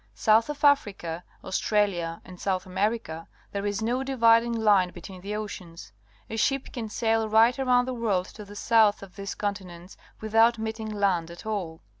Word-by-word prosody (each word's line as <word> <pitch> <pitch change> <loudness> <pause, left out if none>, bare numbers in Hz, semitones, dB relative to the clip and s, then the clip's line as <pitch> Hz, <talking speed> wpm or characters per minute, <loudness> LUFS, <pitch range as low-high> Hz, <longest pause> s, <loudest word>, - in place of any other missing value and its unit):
South 220 - +3
of 295 0 -6
Africa, 195 - +2 0.2
Australia, 190 -4 0
and 180 -1 -12
South 185 -2 -1
America, 190 -3 -2 0.2
there 200 0 -3
is 205 +1 -2
no 245 +3 0
dividing 235 -3 +4
line 210 -5 +3
between 185 +1 -11
the 205 +3 -4
oceans. 175 - -7 0.4
A 225 - -5
ship 270 +4 0
can 230 -4 -5
sail 225 0 0
right 225 +4 +4
around 250 -2 +3
the 255 - -3
world 210 -7 0
to 215 - -10
the 205 0 -12
south 215 -1 +3
of 190 -2 -13
these 200 0 -6
continents 190 -3 -5 0.2
without 225 +2 +3
meeting 220 0 -4
land 195 -5 0
at 170 +3 -11
all. 185 -7 -4
210 Hz, 170 wpm, -26 LUFS, 185-230 Hz, 0.4 s, dividing